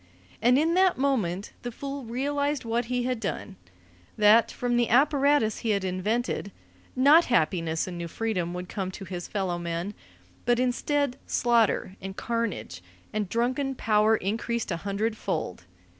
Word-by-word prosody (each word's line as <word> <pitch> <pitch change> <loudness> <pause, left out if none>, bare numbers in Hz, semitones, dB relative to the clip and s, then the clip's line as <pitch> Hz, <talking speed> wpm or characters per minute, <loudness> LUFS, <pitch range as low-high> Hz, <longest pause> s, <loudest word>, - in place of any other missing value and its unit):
And 245 +3 +5
in 320 +3 +2
that 370 0 +4
moment 210 -9 0
the 245 - -5
fool 275 +2 -6
realized 285 +3 -1
what 230 +1 0
he 250 +1 -1
had 250 -1 -1
done: 200 -1 -4 0.6
that, 215 +2 +6
from 245 -1 -1
the 240 -1 +2
apparatus 280 -3 +3
he 230 - -3
had 200 -2 +1
invented, 200 +3 -1 0.4
not 290 +6 +6
happiness 165 -7 +1
and 175 -2 -6
new 170 - -4
freedom 185 -3 -2
would 180 0 -5
come 190 -1 -3
to 190 +1 -8
his 175 -1 -6
fellow 185 -4 -2
men, 170 +3 -3 0.5
but 240 0 +2
instead 260 +2 0
slaughter 230 -5 +2
and 190 0 -7
carnage 230 - -3 0.3
and 210 -3 -1
drunken 255 +5 0
power 215 -1 +3
increased 225 +3 -2
a 170 - -1
hundredfold. 200 - -3
225 Hz, 150 wpm, -27 LUFS, 190-250 Hz, 0.6 s, that